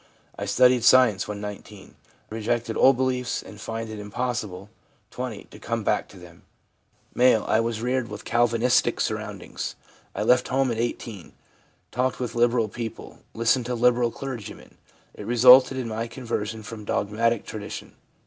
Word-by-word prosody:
I - - -5
studied 125 -2 +4
science 120 -7 +5
when 105 -1 -5
19. 105 -1 -9 0.4
Rejected 115 +1 -2
old 135 -1 +5
beliefs, 125 -2 -1
and 105 +3 -12
find 115 0 -5
it 110 -1 -7
impossible 105 -3 -4 0.4
(20) 125 -5 -5
to - - -15
come - - -3
back - - 0
to - - -15
them/ - - -14 0.7
M. 125 -3 +4
'I 110 - +2
was 115 -1 -2
reared 125 -1 0
with 105 0 -8
Calvinisticsurroundings. 120 +1 0 0.4
I - - -1
left 125 +3 +3
home 135 -1 +1
at 115 - -3
18; 115 -5 -4 0.6
talked 125 +1 -1
with 120 -2 -3
liberal 120 -1 +2
people; 115 +1 -7 0.2
listened 115 +2 +2
to 125 - -2
liberal 120 0 +3
clergymen. 125 -3 -8 0.3
It 105 - -9
resulted 125 +3 +7
in 130 -3 -3
my 110 +1 -3
conversion 110 -3 -4
from 105 0 -8
dogmatic 110 +3 0
tradition. 105 -2 -7
115 Hz, 150 wpm, -25 LUFS, 110-125 Hz, 0.7 s, resulted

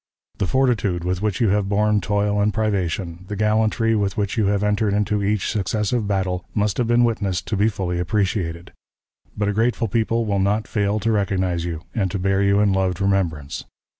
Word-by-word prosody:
The 95 - 0
fortitude 110 -9 +1
with 90 +1 -2
which 105 -3 -1
you 115 - +3
have 100 0 +1
borne 105 +1 +2
toil 105 +1 0
and 105 +1 +2
privation, 95 -5 -2
the 105 - -4
gallantry 110 +2 +2
with 100 0 -1
which 100 -1 -1
you 110 -3 +1
have 100 0 +1
entered 105 0 +1
into 105 0 0
each 105 -1 0
successive 105 +2 -1
battle, 95 -3 -1
must 105 0 0
have 120 - +1
been 120 +1 +4
witnessed 100 -6 0
to 110 - 0
be 105 +3 +3
fully 90 -4 -3
appreciated; 90 -3 -2 0.6
but 105 -1 0
a 105 - 0
grateful 115 +2 +1
people 115 +2 0
will 100 -2 0
not 105 +3 +1
fail 105 0 0
to 115 +2 +1
recognize 95 -5 0
you, 85 -1 -5
and 95 -4 0
to 100 - -3
bear 95 +1 +1
you 100 0 +3
in 100 -2 +3
loved 95 -1 0
remembrance. 90 -8 -1
100 Hz, 195 wpm, -22 LUFS, 95-105 Hz, 0.6 s, been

